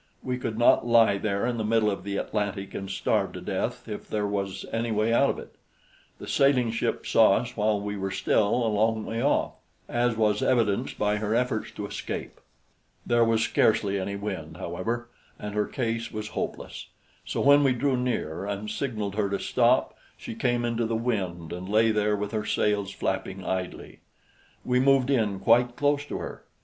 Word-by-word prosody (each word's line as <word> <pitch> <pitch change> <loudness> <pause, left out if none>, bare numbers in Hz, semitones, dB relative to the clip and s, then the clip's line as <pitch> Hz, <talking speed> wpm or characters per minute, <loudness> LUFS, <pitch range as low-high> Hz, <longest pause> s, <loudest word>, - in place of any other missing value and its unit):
We 125 -1 -2
could 115 -3 -3
not 120 - +5
lie 115 -4 +5
there 100 0 -1
in 120 -1 -1
the - - -1
middle 110 -1 +2
of 100 - -5
the 100 0 -3
Atlantic 100 -2 -3
and 95 -1 -5
starve - - 0
to - - -6
death - - -3
if - - -7
there 105 -1 -1
was 100 -2 -3
any 115 +1 -1
way 110 +1 +1
out 140 +4 +4
of - - -1
it. - - -10 0.6
The - - -9
sailing 130 -4 +3
ship 115 - -2
saw - - +5
us - - -3
while 105 0 +1
we 105 0 -4
were 95 -1 -3
still 105 +4 +1
a - - +1
long 110 +1 +1
way 115 +1 -3
off, 145 +3 +2 0.4
as 120 -1 0
was 105 -2 +2
evidenced 115 -6 +1
by 105 0 +1
her 105 +1 -1
efforts 125 -3 0
to 105 - -5
escape. - - -6 0.6
There 120 0 +3
was 115 -1 +2
scarcely 105 -3 +2
any 100 +1 -3
wind, 100 +1 -5
however, 120 +1 -3 0.3
and 105 -1 -6
her 105 0 0
case 115 -2 -2
was 110 -1 -5
hopeless; - - -5 0.4
so - - -4
when 145 +1 +6
we 135 - +4
drew 135 +2 +1
near 120 -8 -2
and 100 +1 -4
signaled 110 -5 -3
her 100 -1 0
to 100 - 0
stop, - - +2 0.2
she - - -7
came 120 0 0
into 115 -1 0
the 115 - -1
wind 95 -9 -2
and 90 +2 -6
lay 110 +2 +4
there 105 -1 +1
with 105 0 -3
her 110 -2 -1
sails 105 -2 0
flapping 95 -1 -3
idly. 95 -1 -4 0.7
We 125 0 +2
moved 135 0 +4
in 105 -7 +1
quite 120 +3 +3
close 145 +1 +1
to - - -5
her. - - -7
110 Hz, 190 wpm, -27 LUFS, 100-120 Hz, 0.7 s, when